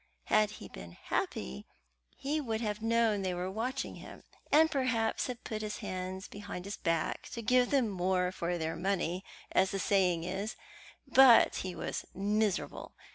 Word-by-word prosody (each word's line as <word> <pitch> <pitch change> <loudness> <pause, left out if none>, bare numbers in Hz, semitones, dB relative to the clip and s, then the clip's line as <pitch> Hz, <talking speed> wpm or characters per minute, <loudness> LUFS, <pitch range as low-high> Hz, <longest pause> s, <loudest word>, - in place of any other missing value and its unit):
Had 215 -1 +5
he - - -9
been 85 0 -10
happy 65 -5 -3 0.5
he 300 +3 -1
would 225 -5 -2
have 210 -1 -2
known 225 -2 +2
that 190 - -1
they - - -1
were 180 +1 -3
watching 250 +6 -3
him, - - -11 0.3
and 320 +2 +6
perhaps 255 -6 +1
have 250 -2 -6
put 215 -2 -4
his 210 -1 -4
hands 185 +1 -5
behind 200 -3 -7
his 200 0 -4
back 165 -2 -1
to 230 - -5
give 250 +2 +4
them 270 -5 +3
more 180 -2 0
for 175 -1 -2
their 160 0 -2
money, 185 0 -1 0.3
as 190 0 +3
the 195 - -2
saying 185 -4 +2
is; 195 +5 -3 0.5
but 260 -3 +7
he 185 -1 -4
was - - -3
miserable. 205 0 -1
205 Hz, 170 wpm, -32 LUFS, 185-230 Hz, 0.5 s, but